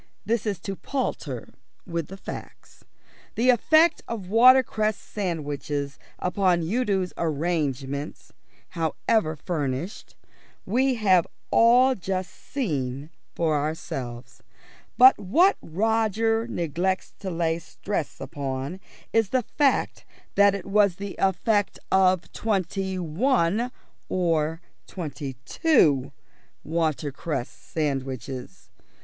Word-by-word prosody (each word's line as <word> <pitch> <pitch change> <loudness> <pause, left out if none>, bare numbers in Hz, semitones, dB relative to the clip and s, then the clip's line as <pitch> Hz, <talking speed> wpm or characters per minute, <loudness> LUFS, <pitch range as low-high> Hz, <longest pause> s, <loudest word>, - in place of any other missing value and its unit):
This 225 +1 0
is 200 -4 -1
to 195 -1 -4
palter 270 +6 -4 0.3
with 170 -4 -3
the 195 - -9
facts. - - -10 0.5
The 250 +3 +5
effect 315 +7 +4
of 205 -6 -5
watercress 230 -3 +5
sandwiches 145 -6 -4 0.2
upon 180 -2 +1
Udo's 195 -1 0
arrangements 145 -4 -2 0.4
(however 165 +2 0
furnished) 150 +2 -4 0.5
we 255 +5 +2
have 190 -6 +3 0.2
all 245 +3 +6
just 190 -3 -3
seen 145 - -3 0.2
for 160 -2 +1
ourselves; 135 -5 -4 0.6
but 260 -2 +8
what 330 - +4
Roger 225 +4 +1
neglects 175 0 -2
to 195 - -4
lay 165 -1 0
stress 190 -1 -4
upon 140 +4 -4 0.3
is 225 -3 +3
the 255 -1 +1
fact 280 +4 +1 0.3
that 200 0 +5
it 200 - -6
was 200 -2 +3
the 200 +1 -6
effect 205 +2 +1
of 185 -2 +3
twenty 190 -2 -1
one 200 - +1 0.4
or 165 -2 0 0.3
twenty 150 -6 -5
two 160 - +3 0.5
watercress 155 -3 -2
sandwiches. 130 - -5
185 Hz, 100 wpm, -25 LUFS, 155-220 Hz, 0.6 s, but